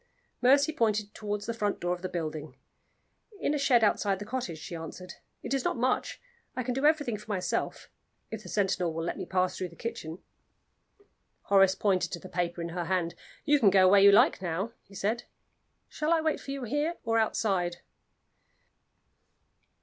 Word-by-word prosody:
Mercy 280 +5 +4
pointed 215 -6 0
toward 210 -1 -3
the 230 - -3
front 210 -3 -1
door 175 0 0
of 180 - -6
the 185 - -4
building. 155 -3 -5 0.8
"In 295 - 0
a 295 - 0
shed 250 -4 +4
outside 205 -2 +2
the 205 - -7
cottage," 215 -8 -4
she 165 +2 -7
answered. 165 +3 -8 0.3
"It - - -3
is 270 -2 0
not - - -1
much; 250 +2 0 0.4
I 255 - -2
can 250 +1 -2
do 270 +4 +2
everything 290 -8 +1
for 210 - -14
myself 190 -3 -2 0.4
if 220 -1 -5
the - - -11
sentinel 185 -4 0
will 165 - -2
let 170 - -2
me - - -5
pass 185 0 +1
through 185 - -4
the 170 - -16
kitchen." 175 -8 -5 1.3
Horace 195 -1 +4
pointed 185 -4 +1
to 170 - -4
the 185 - -11
paper 175 -1 -2
in 170 - -4
her 175 0 -3
hand. 175 -2 0 0.3
"You 295 0 +4
can 210 - +6
go 190 -1 +5
where 195 +1 +6
you 200 0 +8
like 200 - +5
now," 185 +5 -2
he 195 - -18
said. 220 +5 -1 0.6
"Shall 305 +1 -2
I 335 - +4
wait 315 -1 0
for - - -11
you 275 -1 -4
here 295 +8 -1
or 225 -1 +2
outside?" 190 -5 0
205 Hz, 190 wpm, -29 LUFS, 180-240 Hz, 1.3 s, you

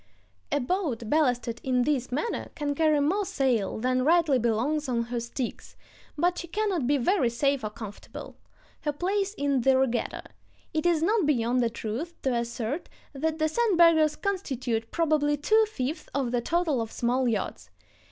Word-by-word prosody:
A - - +2
boat 265 - -2
ballasted 245 -6 +1
in 250 -1 +2
this 265 -3 0
manner 300 - -2
can 290 -1 -1
carry 310 0 +3
more 370 +9 +1
sail 255 - 0
than 255 +3 +1
rightly 315 -3 +4
belongs 255 +6 0
on 235 -2 +1
her 240 +1 -3
sticks, 235 +1 -5 0.4
but 355 +3 +1
she 345 - -6
cannot 375 - -1
be 290 +1 +3
very 275 -1 +2
safe 275 +2 0
or 215 - -2
comfortable. 210 -1 -9 0.4
Her 295 -2 -2
place 390 +5 -1
is - - -25
in 280 -5 +1
the 265 +2 +4
regatta. 255 -3 0 0.5
It 315 +2 +1
is 330 -2 +2
not 410 -2 +2
beyond 250 -3 +2
the 235 - +2
truth 235 +9 -5
to 265 - +1
assert 235 +5 -3 0.2
that 315 +3 -1
the 310 - +1
sandbaggers 335 -6 +4
constitute 260 - -2
probably 305 -3 +1
two 435 +10 +4
fifths 280 -1 -4
of 265 -4 0
the 245 -1 +1
total 325 -3 0
of 225 - -5
small 250 +2 0
yachts. 225 -3 -2
280 Hz, 170 wpm, -27 LUFS, 240-330 Hz, 0.5 s, rightly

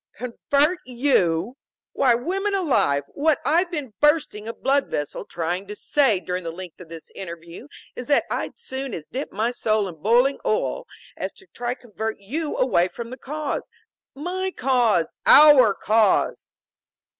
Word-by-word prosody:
"Convert 285 +7 0
you! 240 - +1 0.4
Why 250 -3 +3
women 390 - -1
alive, 250 - +2
what 305 +1 +1
I've 345 +4 +2
been 295 - -5
bursting 295 -8 +2
a 230 - -4
blood 275 +3 +1
vessel 145 -1 -4
trying 175 +3 -3
to 210 - -7
say 250 -5 +2
during 180 +1 -4
the 165 - -4
length 180 +1 -9
of 170 - -12
this 165 -1 -11
interview 170 - -9 0.3
is 250 - -7
that 290 - +3
I'd - - -2
as - - -14
soon 265 - -5
dip 270 +3 -4
my 220 +4 -1
soul 215 -4 0
in 165 -4 -10
boiling 245 - +3
oil - - -1 0.3
as - - -4 0.2
try 240 +1 -3
to - - -30
convert 220 -1 -5
you 290 +10 -4
away 185 -9 +3
from 235 +5 -8
the 255 - -7
cause. 300 +2 -4 0.5
My 365 +6 -3
cause! 245 - +1
Our 285 -8 +8
cause!" 220 0 +2
245 Hz, 155 wpm, -23 LUFS, 195-290 Hz, 0.5 s, Our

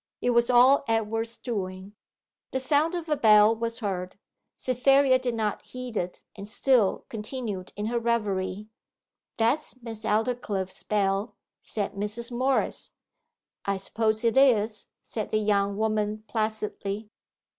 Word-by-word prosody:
It 245 - +1
was 235 0 +3
all 255 +3 +6
Edward's 225 +1 -1
doing. 190 -4 -5 0.6
The - - -1
sound 295 +6 +2
of 340 -1 -4
a 300 - +2
bell 215 -3 +6
was 230 +1 -3
heard. 185 -3 -3 0.4
Cytherea 260 +1 +4
did 245 -2 -2
not 215 -2 -1
heed 250 -2 -8
it, 180 -2 -3
and 200 -1 -8
still 235 -2 +2
continued 215 -4 -5
in 205 - -3
her 235 +2 0
reverie. 210 -4 -1 0.7
'That's 255 +4 0
Miss 225 -2 -7
Aldclyffe's 210 -4 -1
bell,' 200 +1 0 0.3
said 210 -2 -3
Mrs. 210 +4 -3
Morris. 260 +3 0 0.7
'I 200 0 0
suppose 220 +3 -1
it 230 +2 +2
is,' 220 -6 +3 0.2
said 215 -2 -4
the 215 - +1
young 200 -1 +1
woman 215 0 0
placidly. 215 -1 -3
220 Hz, 135 wpm, -27 LUFS, 205-245 Hz, 0.7 s, all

